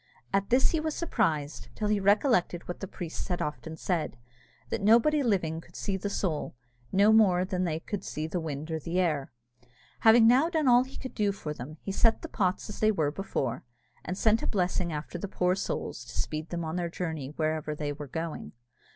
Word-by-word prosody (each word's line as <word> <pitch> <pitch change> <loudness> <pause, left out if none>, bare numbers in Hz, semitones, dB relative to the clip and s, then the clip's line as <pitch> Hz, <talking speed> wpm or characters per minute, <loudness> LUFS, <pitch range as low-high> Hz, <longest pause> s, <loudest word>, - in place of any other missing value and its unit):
At 195 0 +1
this 255 +2 +4
he 325 - +1
was 310 0 -2
surprised, 160 - -1
till 210 - -1
he 210 -1 +2
recollected 200 -3 +2
what 175 - -5
the 195 - -5
priests 170 -2 -6
had 180 -2 -1
often 155 +2 -4
said, 160 -8 -1 0.5
that - - -1
nobody 235 +9 +5
living 180 - 0
could 175 - -20
see 200 - -2
the 195 +2 -3
soul, 175 -10 -2 0.4
no 205 +3 +5
more 185 -5 +5
than 185 -1 -1
they 160 -2 -1
could 200 +3 -5
see 155 - -4
the 170 +3 -2
wind 155 -1 -5
or 160 - -1
the 170 +4 -2
air. 155 -7 0 0.7
Having 225 +1 +7
now 260 +8 +5
done 315 -5 +1
all 245 0 +7
that 260 - -12
he - - -10
could 260 - -7
do 205 -2 +1
for 155 -6 -5
them, 150 +3 -8
he 195 - -3
set 225 +3 +3
the - - -4
pots 185 -3 0
as 210 - -7
they 215 0 +4
were 155 -8 0
before, 135 -9 -3 0.4
and 185 - -4
sent 220 +1 +3
a - - -2
blessing 180 -2 0
after 155 +3 -5
the 200 - -4
poor 180 -1 +1
souls 185 -9 -3
to 120 - -9
speed 155 +1 -3
them 170 -1 -3
on 160 +2 -3
their 175 -1 -1
journey 160 -5 -4
wherever 155 -1 -1
they 150 -1 -3
were 145 0 -8
going. 160 +3 -5
180 Hz, 215 wpm, -29 LUFS, 160-210 Hz, 0.7 s, Having